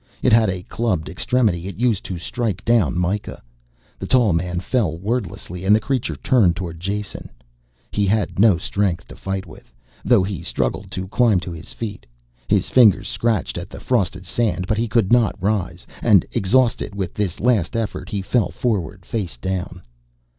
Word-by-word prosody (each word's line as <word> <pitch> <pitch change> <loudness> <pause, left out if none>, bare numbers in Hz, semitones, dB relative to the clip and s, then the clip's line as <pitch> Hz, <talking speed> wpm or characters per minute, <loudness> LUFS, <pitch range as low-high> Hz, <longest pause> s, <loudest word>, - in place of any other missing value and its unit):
It - - +4
had 110 -2 +5
a 90 -1 -3
clubbed 100 -7 -2
extremity 95 -3 0
it 100 - -6
used 115 -4 +1
to 90 - -4
strike 100 +1 -3
down 110 - +3
Mikah. 90 +4 -2 0.6
The - - -5
tall 120 -7 +4
man 90 +1 -1
fell 90 -5 0
wordlessly 95 -3 -4
and 100 +2 +5
the - - +3
creature 130 +2 -2
turned 105 -11 +3
towards 85 -2 -6
Jason. 100 +3 -4 0.6
He 100 -1 +1
had 105 -1 0
no 105 -4 +6
strength 90 0 -1
to - - -10
fight 95 0 -4
with, 80 -7 -15 0.3
though 115 -6 +4
he 95 -3 -4
struggled - - -2
to 95 0 -5
climb 115 -4 +3
to 90 - -6
his 85 0 -9
feet. 105 - -6 0.4
His - - +2
fingers 105 -5 +5
scratched 110 -5 -1
at - - -8
the - - -9
frosted 95 -6 -1
sand, 105 -1 -1
but 110 +3 0
he 115 - 0
could 110 -3 +1
not 120 -4 +3
rise, 100 0 -1 0.2
and - - +5
exhausted 115 0 +1
with 95 -3 -3
this 100 -5 -2
last 115 -4 +1
effort 105 -4 -3
he 100 -2 -3
fell 115 +2 +1
forward 100 -5 -2
face 95 - -3
down. 90 +4 -4
100 Hz, 175 wpm, -21 LUFS, 90-115 Hz, 0.6 s, no